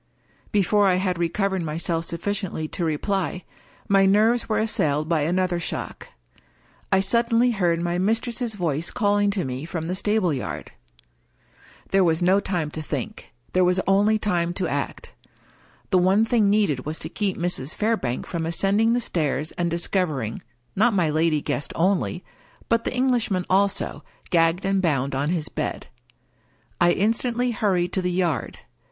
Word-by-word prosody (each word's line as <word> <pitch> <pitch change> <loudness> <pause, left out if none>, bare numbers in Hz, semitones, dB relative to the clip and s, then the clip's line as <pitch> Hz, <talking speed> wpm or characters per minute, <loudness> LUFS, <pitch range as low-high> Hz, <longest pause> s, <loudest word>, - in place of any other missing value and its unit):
Before 205 0 +3
I 185 - +4
had 185 -1 -1
recovered 190 +2 0
myself 165 +1 -2
sufficiently 175 -2 -3
to 175 - -3
reply, 180 +3 -1 0.4
my 195 -1 +4
nerves 220 +5 +3
were 215 - +1
assailed 155 -9 0
by 165 -2 +1
another 175 +3 0
shock. 170 - -5 0.8
I 190 - +4
suddenly 235 +4 +2
heard 175 -6 +1
my 175 +1 -1
mistress's 225 +3 -1
voice 165 -3 -1
calling 205 -1 +1
to 195 -3 -1
me 130 +1 -4
from 165 0 -4
the 175 - -2
stable 200 -3 +1
yard. 130 - -5 1.2
There 195 0 +4
was 165 -2 +2
no 185 +3 +4
time 175 -6 -2
to 155 - -5
think 155 - -5
— - - -36
^there 185 - +4
was 180 +1 +2
only 205 +3 +3
time 175 -5 -1
to 185 - -1
act. - - -4 0.8
The 185 - +5
one 190 +5 +4
thing 225 -3 +2
needed 200 -11 +2
was 155 +2 -4
to - - -5
keep 200 -3 -2
Mrs. 170 -5 -2
Fairbank 210 - -1
from 165 -2 -3
ascending 200 +7 +2
the 245 - +1
stairs, 155 - -1
and 175 -1 -2
discovering 165 - -1 0.2
— 120 - -42
^not 220 +4 +3
my 175 -6 +2
lady 155 -1 +1
guest 145 - -3
only 185 +1 0 0.2
— - - -29
but 230 0 +2
the - - 0
Englishman 240 -8 +1
also, 200 +1 +1 0.3
gagged 165 +1 +2
and 195 0 +1
bound 140 -6 0
on 140 +3 0
his 165 -3 0
bed. - - -4 0.9
I 175 0 +5
instantly 235 +4 0
hurried 185 -5 0
to 190 - +1
the 180 - -1
yard. 175 -3 -1
185 Hz, 165 wpm, -24 LUFS, 165-205 Hz, 1.2 s, The